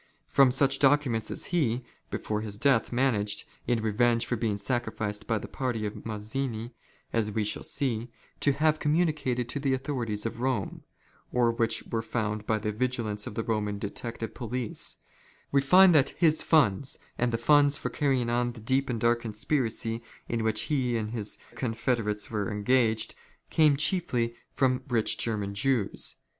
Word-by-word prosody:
From 135 -2 +5
such 135 +1 +3
documents 135 -5 +3
as - - -2
he, 130 -7 +1 0.3
before 105 0 -2
his 105 -2 -5
death, 130 0 +3
managed, 110 -5 +1 0.2
in 115 -2 +1
revenge 115 +2 +2
for 120 - -1
being 110 -3 -1
sacrificed 110 -1 -2
by 115 - +1
the - - -6
party 120 -5 -2
of 105 - -6
Mazzini, 110 +2 -3 0.4
as 110 -2 +1
we 110 +1 0
shall 105 - -2
see, 120 -4 -1 0.3
to 145 - +4
have 155 +2 +2
communicated 150 -6 +1
to 145 - -3
the 135 -1 +1
authorities 120 -6 -3
of 115 - -3
Eome; 125 -5 -2 0.5
or 120 -1 +3
which 115 -1 0
were 115 - -2
found 105 -2 -3
by 110 - +2
the 105 0 -2
vigilance 110 -3 -2
of - - -7
the 115 - -1
Roman 105 -2 -1
detective 115 +3 -5
police; 120 -1 -3 0.5
we 140 - +4
find 180 +6 +7
that 140 -3 +3
his 160 -3 +3
funds, 135 - +2 0.2
and 125 0 +2
the 115 - 0
funds 145 +3 +4
for 125 - -4
carrying 130 -3 +1
on 120 0 0
the 115 - -11
deep 130 +5 0
and 120 -2 -1
dark 120 +1 +2
conspiracy 115 0 -1 0.3
in 115 -1 -1
which 110 -1 +1
he 130 -6 0
and 110 -1 -3
his 110 -3 -3 0.2
confederates 115 -4 -1
were 105 -1 -1
engaged, 110 +1 +2 0.4
came 150 -3 +4
chiefly 145 -7 +1 0.2
from 130 -1 +2
rich 115 -4 +1
German 105 -3 -1
Jews. 115 0 0
120 Hz, 165 wpm, -28 LUFS, 110-135 Hz, 0.5 s, find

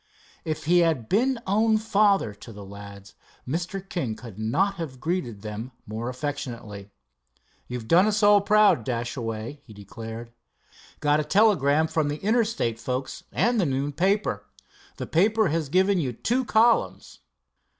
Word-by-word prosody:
If 155 -1 -4
he 175 +3 +4
had 160 -9 +1
been 255 +6 +2
own 220 +3 +3
father 205 - +2
to 110 +3 -12
the 100 -2 -10
lads, 100 0 -11 0.3
Mr. 175 +7 -4
King 130 - -3
could 110 -5 -11
not 190 - 0
have 145 -7 -6
greeted 130 - -3
them 110 +4 -6
more 110 +3 -4
affectionately. 120 -7 -6 0.8
"You've 125 -2 -6
done 180 - +5
us 215 0 0
all 205 0 +6
proud, 210 - +4
Dashaway," 120 +1 -4
he 110 - -14
declared. 115 +3 -9 0.7
"Got 145 0 +3
a - - 0
telegram 160 -7 +3
from 160 -1 0
the 145 +1 -2
Interstate 215 - 0
folks, 130 +2 -4
and 235 -2 +2
the - - +1
noon 135 +2 -1
paper. 195 +7 0 0.5
The - - -4
paper 210 +4 +2
has 155 -2 -1
given 190 +3 +3
you 130 -6 -2
two 245 - -1
columns. 230 +1 +2
150 Hz, 150 wpm, -25 LUFS, -, 0.8 s, all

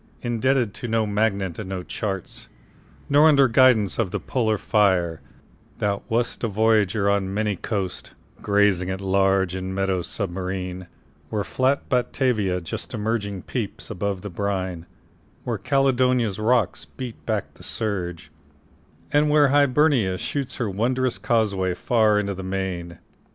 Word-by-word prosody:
Indebted 120 -1 +1
to 120 - -6
no 115 -1 +1
magnet 100 -4 -1
and 105 -3 -6
no 95 -2 -4
chart, 95 -3 -5 0.6
Nor 145 +2 +6
under 140 -3 +6
guidance 120 -5 +4
of 110 -5 +1
the - - -3
polar 110 -4 0
fire, 95 -7 +1 0.6
Thou 100 -1 -1
wast 120 +2 0
a - - +2
voyager 105 -1 +2
on 100 -1 +1
many 105 0 0
coasts, 95 -1 -4 0.3
Grazing 100 -3 +2
at 95 0 -3
large 95 -1 +2
in 95 0 -4
meadows 95 -2 -1
submarine, 90 -2 -4 0.4
Where 105 -2 -1
flat 130 +5 0
Batavia 120 -7 0
just 80 - -6
emerging 105 -3 -2
peeps - - -5
Above 100 +1 -3
the 105 - -6
brine, 95 -3 -3 0.6
where - - -3
Caledonia's 125 -6 +2
rocks 115 -2 +1
Beat 125 -3 -8
back 110 -3 -2
the - - -18
surge, 90 -8 -3 0.8
and 150 +1 +4
where 150 -1 +5
Hibernia 140 -8 +3
shoots 140 +6 -3
Her 120 - -2
wondrous 125 +6 0
causeway 100 -7 +1
far 110 0 +3
into 100 -1 -2
the 95 - -7
main. 95 -3 -4
105 Hz, 140 wpm, -23 LUFS, 95-120 Hz, 0.8 s, Nor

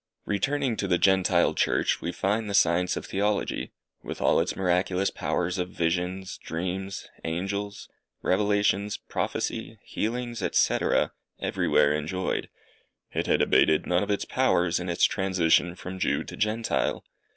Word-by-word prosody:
Returning 130 +5 0
to 100 - -1
the 90 -1 +3
Gentile 95 0 +3
Church, - - +1
we 85 - -2
find 105 +4 -1
the 100 - -1
science 90 0 +3
of - - -5
Theology, 100 +1 -1 0.3
with - - -7
all - - +3
its 85 - -1
miraculous 90 +1 +1
powers 90 +2 -1
of 90 0 -2
visions, 90 +2 -2
dreams, 95 +4 -4 0.2
angels, 100 +5 -3 0.4
revelations, 100 0 +1
prophecy, - - -3
healings, 120 +1 -3 0.2
&c., - - +4 0.6
everywhere 75 - +2
enjoyed. 80 +5 -2 0.6
It - - -2
had - - +3
abated 80 -1 +4
none 90 0 +2
of 105 - -3
its 100 - 0
powers, 90 -10 +2
in 90 0 -4
its 85 - 0
transition 90 -4 +2
from 95 +1 -7
Jew - - +1
to - - -9
Gentile. 110 +2 -1
95 Hz, 140 wpm, -27 LUFS, 90-100 Hz, 0.6 s, c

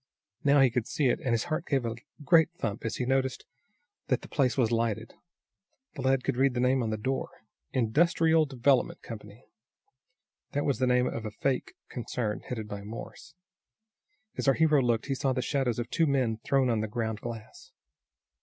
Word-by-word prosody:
Now 140 0 +5
he 130 -2 +5
could 115 -1 -1
see 140 -4 +1
it, - - +1
and 130 - -3
his 115 -1 +2
heart 170 0 -3
gave 135 -4 +1
a 115 - -1 0.3
great 160 +1 +5
thump 110 +1 -3
as 115 - -2
he 125 - -2
noticed 130 0 0 0.6
that - - 0
the - - -9
place 135 -4 +1
was 120 -4 +2
lighted. 115 -1 -1 0.8
The 140 - -6
lad 130 0 +2
could 135 -3 -1
read 135 -1 +3
the - - 0
name 130 +1 +3
on 115 - -1
the 110 - -1
door. 130 +5 -2 0.4
"Industrial 160 +6 +3
Development 130 -1 +2
Company." 105 +1 -10 1.1
That 145 - 0
was 140 - 0
the 130 - +2
name 125 0 +3
of 115 -3 -3
a 110 - -3
fake 130 +5 -2
concern 115 -3 -3
headed 110 -4 -6
by 100 -1 -6
Morse. 115 +7 -9 1.0
As - - -2
our 135 - +5
hero 155 -3 +4
looked 120 -3 +1
he 135 - -1
saw 135 0 0
the 130 - -1
shadows 130 -5 0
of 120 0 -2
two 165 - +2
men 130 -6 +1
thrown 130 +2 +1
on 115 - +1
the 110 - -2
ground 110 -1 -3
glass. 115 -2 -8
125 Hz, 190 wpm, -29 LUFS, 115-135 Hz, 1.1 s, Now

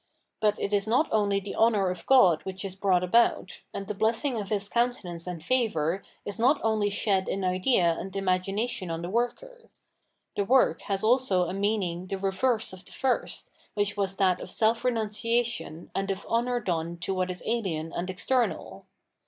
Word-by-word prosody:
But 210 -1 +2
it 200 - -2
is 205 +1 +2
not 255 +8 +3
only 200 -2 +2
the 200 0 -7
honour 210 -5 +3
of 180 - -8
God 190 -12 +6
which 190 +1 -6
is 190 - -5
brought 190 -2 +2
about, 190 -1 +2
and 200 - -5
the 210 - -4
blessing 225 +6 0
of 200 - -7
His 205 -1 -1
coimtenance 205 -8 -1
and 170 -3 -5
favour 195 -7 +1 0.2
is 205 +2 -4
not 265 +6 +4
only 215 -2 +2
shed 195 -2 0
in 195 - -2
idea 185 -1 +2
and 190 0 -7
imagination 195 +1 -1
on 165 0 -4
the 175 - -4
worker; 465 - -3 0.7
the 200 - +1
work 255 +5 +3
has 195 0 0
also 215 -6 +3
a 180 - -4
meaning 195 -3 -1
the 195 - -3
reverse 200 +4 0
of 185 0 -11
the - - -17
first 265 -2 -2 0.2
which 205 0 0
was 195 -2 -1
that 185 -2 +2
of - - -7
self 225 +4 +1
renunciation 230 -5 -1
and 195 0 -2
of 195 0 -3
honour 240 +1 0
done 170 -5 -2
to 180 +3 -3
what 185 -1 -1
is 180 0 -6
ahen 180 -9 -2
and 180 +2 -3
external. 240 +6 -1
200 Hz, 185 wpm, -27 LUFS, 185-230 Hz, 0.7 s, God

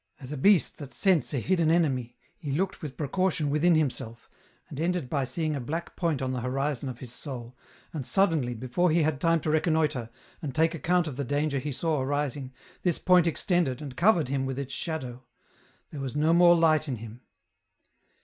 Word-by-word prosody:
As 130 0 -9
a - - -3
beast 190 +4 +3
that 140 -3 -9
scents 190 -6 +2
a 145 - -1
hidden 165 - +1
enemy, 135 -8 +1 0.2
he 145 -5 -6
looked 185 +7 -1
with 150 -5 -7
precaution 155 0 0
within 165 +3 +3
himself, 130 -6 -2 0.4
and - - -8
ended 170 -5 -1
by 140 -3 0
seeing 155 +4 -2
a - - -2
black 160 +7 -5
point 160 -6 -1
on 130 - -1
the 125 -1 -3
horizon 135 +1 -2
of 125 - -7
his 125 -2 -7
soul, 125 -4 -6 0.4
and 150 -4 -4
suddenly, 155 -7 +1
before 130 +10 0
he 165 +1 +3
had 150 -2 -1
time 165 0 +3
to 155 - -1
reconnoitre, 155 -6 +1 0.3
and 140 -6 -5
take 160 +1 +3
account 175 +2 +1
of 145 -5 -6
the 140 - -1
danger 145 +1 0
he 145 +3 -4
saw 155 +1 -1
arising, 140 -1 -2 0.3
this 175 -3 +1
point 180 -2 +4
extended, 165 -5 0
and 140 -4 -8
covered 175 - +3
him 135 0 -1
with 135 -1 -3
its 135 -1 -5
shadow; 130 -7 -5 0.7
there 145 - -6
was 135 0 -5
no 155 +2 +3
more 175 0 +7
light 160 -2 +3
in 135 - -2
him. 115 +1 -10
150 Hz, 195 wpm, -27 LUFS, 130-165 Hz, 0.7 s, more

